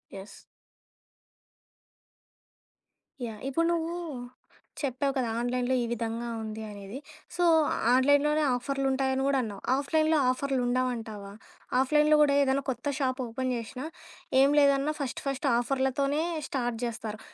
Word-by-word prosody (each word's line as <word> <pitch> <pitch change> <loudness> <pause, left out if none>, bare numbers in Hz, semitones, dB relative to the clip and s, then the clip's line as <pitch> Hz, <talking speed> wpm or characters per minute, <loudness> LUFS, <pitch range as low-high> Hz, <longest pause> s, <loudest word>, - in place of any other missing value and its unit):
Yes. 195 +1 -10 2.9
Yeah! 220 -2 -7
ఇప్పుడు 300 +5 +1
నువ్వు 335 0 -1 0.9
చెప్పావు 275 0 -1
కదా! 255 -3 0
ఆన్‌లైన్‌లో 250 +1 0
ఈ - - 0
విధంగా 230 0 -3
ఉంది 220 0 -6
అనేది. 200 +4 -8 0.4
సో, 355 - +1 0.5
ఆన్‌లోన్‌లోనే 285 +4 +4
ఆఫర్‌లుంటాయని 265 0 0
గూడా 275 -1 +2
అన్నావు. 205 -3 -6
ఆఫ్‌లైన్‌లో 310 +3 +2
ఆఫర్‌లుండవంటావా? 245 -5 -1 0.5
ఆఫ్‌లైన్‌లో 300 +3 +4
కూడా 290 -1 +4
ఏదైనా 275 0 +1
కొత్త 250 +2 -3
షాప్ 260 -1 0
ఓపెన్ 255 +2 -3
చేసినా, 240 +4 -6 0.6
ఏం 275 - +6
లేదన్నా 280 +1 +3
ఫస్ట్, 275 -4 -3
ఫస్ట్ 275 +1 -1
ఆఫర్‌లతోనే 270 +3 0 0.3
స్టార్ట్ 245 -3 -2
జేస్తారు. 225 -2 -4
260 Hz, 110 wpm, -28 LUFS, 240-280 Hz, 2.9 s, ఏం